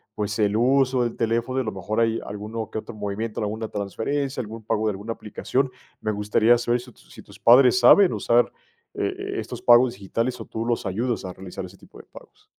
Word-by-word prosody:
pues, 105 0 -2
el 105 0 +2
uso 130 0 +3
del 115 - -3
teléfono, 115 +3 -1
y - - +2
a - - -5
lo 110 - -2
mejor, 110 +4 -2
hay 115 0 +1
alguno 105 +1 -6
que - - -6
otro 120 - -9
movimiento, 105 +1 -4
alguna 110 +1 -3
transferencia, 130 +8 -3
algún 110 0 -8
pago 110 -1 0
de - - +2
alguna 105 +3 -5
aplicación. 130 +5 -2 0.3
Me 110 - -1
gustaría 110 +3 +3
saber, 120 0 0
¿si 125 - -13
tus - - -23
si - - -11
tus - - -16
padres 125 +1 +6
saben 180 +10 +7
usar, 120 +1 +2 0.4
eh, 395 +1 -3
estos 125 -1 -6
pagos 120 0 +6
digitales, 115 +6 -3
o - - -7
tú 115 +1 -5
los 120 -1 -1
ayudas 115 +5 -2
a 90 - -5
realizar 95 0 -8
ese 95 +2 -13
tipo - - -17
de - - -12
pagos? - - -16
115 Hz, 215 wpm, -24 LUFS, 105-125 Hz, 0.4 s, saben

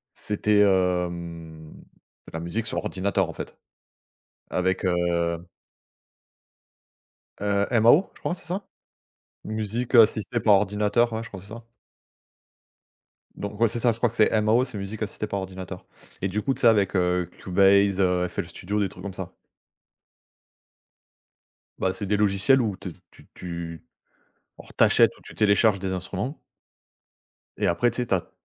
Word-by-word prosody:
c'était 105 0 0
hem, 85 -4 -1 0.5
de - - -12
la 80 - -4
musique 95 +7 -3
sur - - -1
ordinateur 95 -1 -1
en - - -6
fait. - - -8 0.9
Avec 95 +2 0
heu 85 -1 0 2.0
Heu, 100 0 +1
MAO, 130 - +5
je - - -19
crois - - -2
c'est 175 - -13
ça? 185 +4 -4 0.8
Musique 110 +3 -3
Assistée 115 0 +4
Par 105 -1 +5
Ordinateur, 105 +4 +2
ouais, 110 0 -3
je 115 - -9
crois 95 - -9
c'est 100 - -14
ça. 115 +2 -10 1.7
Donc 100 0 -6
ouais, 115 - +5
c'est 115 - -2
ça, 120 0 +3
je - - -8
crois 120 +1 +2
que - - -6
c'est 110 - +4
MAO 110 +4 +3
c'est 125 -4 -8
Musique 100 +3 -6
Assistée 105 0 -3
Par 100 -1 -3
Ordinateur. 95 -1 -8 0.3
Et 95 - -1
du 105 +3 -2
coup, 135 - +1
tu - - -7
sais, - - +3
avec, 100 -4 +3
heu, 90 -1 +1
Cubase, 100 +1 +3
heu, 90 -1 +2
FL - - -4
Studio, 90 +4 -4
des 100 - +1
trucs 90 - -12
comme 100 -1 -6
ça. 95 -1 -7 2.5
Bah, 95 - 0
c'est 95 +2 -4
des 105 +2 +1
logiciels 105 +6 +3
où 105 -5 -1
t 95 - -7 0.2
tu - - -19
tu 85 -2 -7 0.8
alors - - -13
tu - - +6
achètes - - +4
ou - - -20
tu - - -12
télécharges 105 0 +3
des 95 0 -3
instruments. 95 - -4 1.2
Et - - +1
après 120 +8 +2
tu 120 - -4
sais, - - -4
tu 100 - +1
as 90 - -3
100 Hz, 160 wpm, -25 LUFS, 90-110 Hz, 2.5 s, tu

